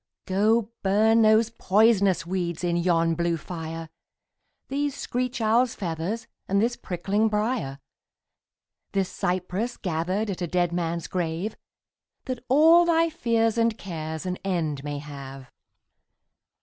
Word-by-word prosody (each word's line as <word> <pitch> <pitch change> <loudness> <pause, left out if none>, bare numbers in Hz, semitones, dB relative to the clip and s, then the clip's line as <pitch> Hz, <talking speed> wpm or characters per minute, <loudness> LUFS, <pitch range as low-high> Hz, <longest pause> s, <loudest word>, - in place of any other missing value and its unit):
Go 215 +4 +2
burn 220 +4 +4
those 220 +1 +4
poisonous 200 -5 +3
weeds 175 -2 -3
in 175 -1 +1
yon 170 -1 +2
blue 170 0 0
fire, 165 0 -6 0.8
These 285 +1 -1
screech 250 -1 -3
owl's 230 +2 +2
feathers 175 +5 -3 0.2
and 200 +1 +2
this 235 +3 +1
prickling 200 +5 -1
briar, 210 - -1 1.2
This 195 -2 0
cypress 185 +6 -2
gathered 185 +4 -1
at 185 - -6
a 175 - -1
dead 175 0 +1
man's 170 -1 -2
grave, 175 +4 -2 0.7
That 255 -2 -4
all 320 +6 +7
thy 330 -1 +3
fears 230 -6 +1
and 230 -1 +2
cares 160 -3 -5
an 180 0 -2
end 160 -7 -1
may 145 0 -4
have. 135 -2 -9
190 Hz, 125 wpm, -25 LUFS, 170-225 Hz, 1.2 s, all